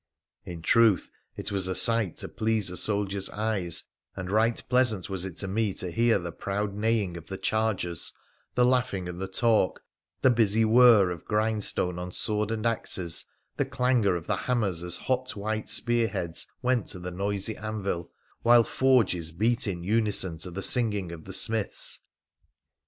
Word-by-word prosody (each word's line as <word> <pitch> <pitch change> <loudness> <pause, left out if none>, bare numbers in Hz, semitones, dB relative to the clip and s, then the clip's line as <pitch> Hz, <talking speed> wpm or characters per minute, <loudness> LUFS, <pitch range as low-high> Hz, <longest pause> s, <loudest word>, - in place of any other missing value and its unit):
In 85 -2 -8
truth, 115 0 +3 0.3
it - - -4
was 95 -2 -1
a 95 - -2
sight 115 -6 +3
to - - -2
please 110 -4 -1
a - - -6
soldier's 100 -1 +3
eyes, 100 -6 0 0.3
and 90 -1 -6
righ 110 +2 +3 0.2
pleasant 120 -7 +1
was 95 -1 -3
it 90 - -10
to 95 - -2
me 105 0 -1
to 90 -1 -2
hear 115 +3 +3
the 85 -2 -5
proud 100 +4 -3
neighing 105 -4 -1
of 85 - -11
th< 95 - -7
chargers, 110 -6 -1 0.4
the 125 - +4
laughing 120 -8 0
and 90 +1 -7
the 95 - -3
talk, 110 0 +1 0.4
the 130 - +6
busy 110 -1 +3
whirr 110 -4 +6
of 85 -3 -7
grind 110 0 0
stone 90 -2 +1
on 90 0 -6
sword 105 +2 0
and 110 0 -3
axes, 95 -7 0 0.3
the - - +2
clangour 120 -7 +1
of 85 -1 -5
the - - 0
hammers 105 -9 -1
as 90 0 +1
th< - - -13
hot 130 0 -1
white 110 +1 -3
spearheads 115 -8 0 0.2
went 125 -4 +1
to - - -3
the 90 0 -6
noisy 100 +3 -2
anvil, 100 -5 -4 0.3
while 120 0 +6
forges 110 -12 +1
beat 110 +7 +1
in 90 -3 -4
unison 100 -5 0
to 90 - -6
the 95 +3 -5
singing 105 -8 +2
of 80 -2 -10
the 95 - -6
smiths. 110 +1 -1
105 Hz, 175 wpm, -27 LUFS, 90-115 Hz, 0.4 s, the